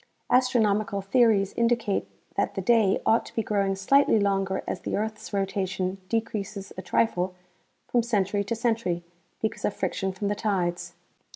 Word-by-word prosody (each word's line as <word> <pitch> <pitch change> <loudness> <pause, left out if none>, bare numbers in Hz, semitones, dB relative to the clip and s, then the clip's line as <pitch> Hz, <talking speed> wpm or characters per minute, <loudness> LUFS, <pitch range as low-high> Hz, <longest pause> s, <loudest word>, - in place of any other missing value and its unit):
Astronomical 220 -5 +2
theories 200 -2 +3
indicate 235 -3 +1 0.3
that - - 0
the - - -1
day 225 -5 +4
ought 225 - +4
to - - -14
be 225 - 0
growing 200 -2 0
slightly 225 +4 +4
longer 195 -1 0
as - - -2
the - - -3
earth's 215 +1 -4
rotation 195 -1 -1
decreases 210 -3 -3
a - - -5
trifle 185 -5 0 0.5
from 240 - +2
century 205 -3 0
to 230 - -2
century 225 -7 0 0.4
because 220 -1 -2
of 210 - 0
friction 190 +1 -1
from 195 +2 -3
the 205 - +1
tides. 185 -5 -1
205 Hz, 155 wpm, -26 LUFS, 195-225 Hz, 0.5 s, day